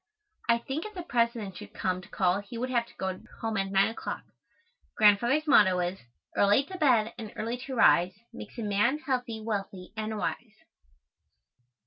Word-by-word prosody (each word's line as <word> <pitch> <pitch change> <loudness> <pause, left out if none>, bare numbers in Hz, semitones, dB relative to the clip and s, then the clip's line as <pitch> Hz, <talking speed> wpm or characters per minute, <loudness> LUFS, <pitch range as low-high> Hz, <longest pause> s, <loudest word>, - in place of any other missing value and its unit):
I 235 - +6
think 270 - -4
if 425 -1 -8
the 355 - -5
President 235 - 0
should - - -11
come 185 -1 -1
to 180 - -15
call 185 0 +1
he 205 +3 -8
would 255 +2 -2
have 235 -2 +1
to - - -18
go 190 -1 -3 0.2
home 225 -1 -1
at 195 0 0
nine 195 +1 +4
o'clock. 225 - -5 0.7
Grandfather's 235 +8 +4
motto 205 - +5
is: 180 +2 -2 0.4
"Early 205 +6 +4
to 370 +7 -8
bed 235 -7 +3
and 220 -2 -6
early 230 +3 -3
to 265 - -4
rise 185 -5 +5 0.2
Makes 245 - -10
a 230 - -3
man 210 +7 +2
healthy, 250 -6 -2
wealthy 195 -4 -4
and 215 0 -3
wise." 220 +1 -4
220 Hz, 175 wpm, -29 LUFS, 195-245 Hz, 0.7 s, I